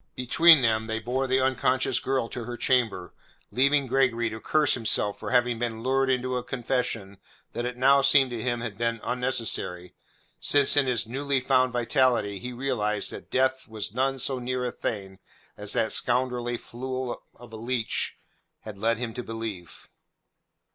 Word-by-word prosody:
Between 155 +4 +6
them 110 -1 +1
they 110 0 -2
bore 125 +4 -2
the 130 +1 +2
unconscious 130 0 +1
girl 130 -3 -1
to 120 - -6
her 120 0 -6
chamber, 120 - 0 0.4
leaving 140 +2 +3
Gregory 125 -3 +1
to 110 - -6
curse 150 +4 +2
himself 110 -3 0
for - - -5
having 120 -2 +2
been 115 -2 -3
lured 135 +1 +1
into 130 0 0
a 125 - -4
confession 120 -6 -3 0.3
that 120 +1 -3
it 125 0 -6
now 135 +2 +5
seemed 135 -1 +5
to 120 -2 -4
him 120 -1 -2
had 110 -3 -6
been 115 -1 -1
unnecessary, 115 -8 -2 0.5
since 145 -1 +3
in 145 -2 +4
his 120 -2 +1
newly 135 +3 -1
found 130 0 +2
vitality 120 -4 +1
he 125 - -6
realized 120 -5 -1
that - - -10
death 130 0 0
was 110 -1 -4
none 135 +2 0
so 130 0 0
near 125 0 -2
a 125 - -2
thing 95 -4 -5 0.4
as - - -3
that - - +1
scoundrelly 125 -1 +1
fool 130 +1 -5
of 120 -2 -15
a - - -6
leech 115 0 -2 0.4
had 105 -2 -10
led 115 +2 +1
him 115 -1 -4
to 125 - -5
believe. 110 -8 -7
125 Hz, 170 wpm, -26 LUFS, 115-130 Hz, 0.5 s, Between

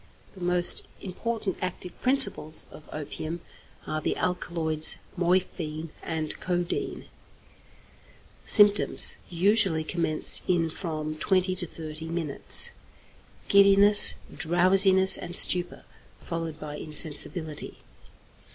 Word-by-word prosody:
The 190 - -16
most 175 0 +4
important 205 +1 -6
active 185 -1 -7
principles 255 - +4
of 155 - -16
opium 155 +2 -8 0.4
are 155 - -5
the - - -4
alkaloids 165 -3 0 0.2
morphine 170 -3 -3
and 160 -2 -6
codeine. 175 -1 -5 1.4
Symptoms 205 -1 +3
usually 185 -2 0
commence 155 -1 -1
in 170 -3 -1
from 155 -3 -7
twenty 185 +1 -1
to 180 -1 -5
thirty 155 0 -9
minutes: 165 -4 +3 0.8
Giddiness, 200 +1 +5 0.2
drowsiness 190 +2 +2
and 175 0 -9
stupor, 180 -1 +2 0.4
followed 165 -2 -7
by 150 -1 -9
insensibility. 155 +1 +1
175 Hz, 95 wpm, -24 LUFS, 155-185 Hz, 1.4 s, Giddiness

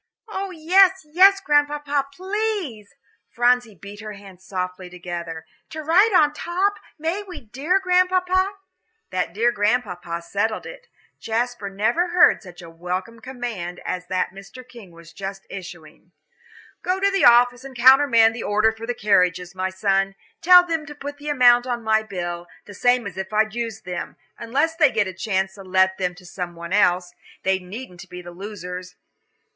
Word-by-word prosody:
"Oh, 395 -2 -4
yes, 370 +2 +3
yes, 380 +6 +5
Grandpapa, 290 -3 +1
please" 375 - -4 0.3
Phronsie 245 -2 +1
beat 200 +4 -11
her 215 -1 -7
hands 195 -2 -14
softly 185 -1 -5
together 170 -2 -7 0.2
"to 315 0 -7
ride 370 +8 +4
on 300 -6 +4
top; 370 +6 -1 0.2
may 330 +6 -2
we, 385 -3 -10
dear 275 - -1
Grandpapa?" 370 +1 +2 0.6
That 180 -2 -1
"dear 230 +6 +2
Grandpapa" 200 -6 -1
settled 210 +5 -2
it. - - -11 0.3
Jasper 230 -2 -2
never 220 - 0
heard 350 0 +4
such 180 -3 -13
a 170 - -10
welcome 180 +7 -5
command 225 -8 -6
as 180 0 -4
that 185 +1 -1
Mr. 195 +6 -12
King 235 -7 -13
was 165 -1 -16
just 195 +1 -7
issuing. 175 -2 -11 0.7
"Go 370 +1 -1
to 395 +1 +2
the 390 -1 +2
office 245 +1 +5
and 270 -1 -10
countermand 240 -2 +6
the 235 - -6
order 215 +2 +2
for 225 +1 -9
the 245 - -2
carriages, 180 -4 +1
my 185 0 -2
son; 195 0 0 0.3
tell 360 +1 +8
them 325 -3 -3
to 295 - -9
put 290 0 -8
the 295 +1 -6
amount 245 -3 +5
on 240 -2 -3
my 220 0 +2
bill, 175 -4 -5 0.2
the 205 - -11
same 245 +4 +2
as 190 -2 -7
if 190 +1 -5
I'd 215 0 +1
used 230 -2 -5
them, 180 -1 -5 0.2
unless 280 +8 0
they 310 -4 +5
get 220 -5 +1
a 185 - -6
chance 190 0 -2
to 195 - -12
let 190 0 +2
them 180 -1 -1
to 180 0 -16
some 175 -1 -6
one 170 +2 -7
else. 180 -3 +2 0.3
They 190 0 +1
needn't 185 -1 -10
be 180 0 -9
the 175 - -9
losers. 180 -1 -8
220 Hz, 170 wpm, -22 LUFS, 185-295 Hz, 0.7 s, tell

